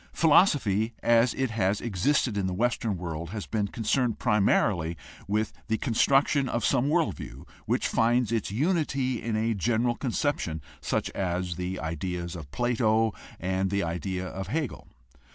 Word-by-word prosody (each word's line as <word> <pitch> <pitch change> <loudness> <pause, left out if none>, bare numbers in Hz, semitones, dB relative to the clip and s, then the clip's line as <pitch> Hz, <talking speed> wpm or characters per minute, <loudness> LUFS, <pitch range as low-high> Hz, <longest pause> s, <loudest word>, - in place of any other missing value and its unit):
Philosophy 125 - +3
as 115 +1 +4
it 130 -3 -1
has 100 -2 +1
existed 120 +3 +1
in 100 -2 0
the 90 - -2
Western 115 -2 0
world 85 -1 -5
has 105 +1 -5
been 105 -2 -1
concerned 115 +3 0
primarily 95 -5 +2 0.3
with 105 +2 0
the 110 0 +1
con 120 - -2
struction 135 +2 +3
of 120 -2 -1
some 135 +1 +2
world 165 0 +2
view - - -9 0.2
which - - +1
finds 120 0 +2
its 115 -3 0
unity 135 - 0
in 115 -2 -2
a 115 +1 +1
general 115 +4 +1
conception 125 - -1 0.2
such - - -1
as 90 -1 -2
the 90 +1 -4
ideas 85 +2 -4
of 80 -5 -8
Plato 115 - +1 0.3
and 95 +2 0
the 100 +1 0
idea 90 +2 -3
of 95 0 -5
Hegel. 150 +3 -3
110 Hz, 155 wpm, -27 LUFS, 95-120 Hz, 0.3 s, as